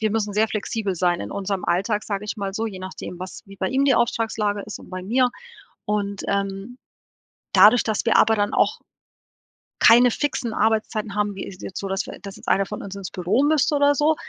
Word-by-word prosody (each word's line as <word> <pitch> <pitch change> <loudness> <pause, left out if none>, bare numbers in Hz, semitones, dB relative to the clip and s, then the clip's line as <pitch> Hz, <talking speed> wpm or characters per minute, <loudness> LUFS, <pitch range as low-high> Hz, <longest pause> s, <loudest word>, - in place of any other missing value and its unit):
wir 215 -1 +1
müssen 210 -2 -1
sehr 215 +2 +2
flexibel 215 -2 -2
sein 175 0 +1
in - - -6
unserem 195 -1 -3
Alltag, 205 +4 0
sage 200 0 -3
ich 210 - -4
mal 195 -1 -3
so, 220 +3 -2
je 195 -4 -6
nachdem, 185 -1 -7
was 185 0 -8
wie 195 0 -13
bei 190 - -1
ihm 270 +2 +1
die 270 -3 +4
Auftragslage 220 -3 0
ist 215 - -7
und - - -14
bei 185 0 -5
mir 250 +4 +2 0.5
und, 200 -1 -2
ähm, 200 +4 -3 0.8
dadurch, 245 - +7
dass 215 0 -1
wir 230 - +4
aber 225 - +5
dann 205 -1 0
auch - - +1 1.0
keine 245 +2 +7
fixen 245 -5 -2
Arbeitszeiten 215 -1 0
haben, 205 -1 0
wie 195 - -5
ist 185 - -10
jetzt 185 - -6
so, 195 - -4
dass 195 0 -1
wir - - -8
das 200 -1 -8
jetzt - - -16
einer 195 - +3
von 210 - -6
uns 200 0 -7
ins 195 -2 -6
Büro 195 +9 +1
müsste 300 0 +2
oder 285 0 +4
so, 305 +2 +3
210 Hz, 220 wpm, -23 LUFS, 195-225 Hz, 1.0 s, dadurch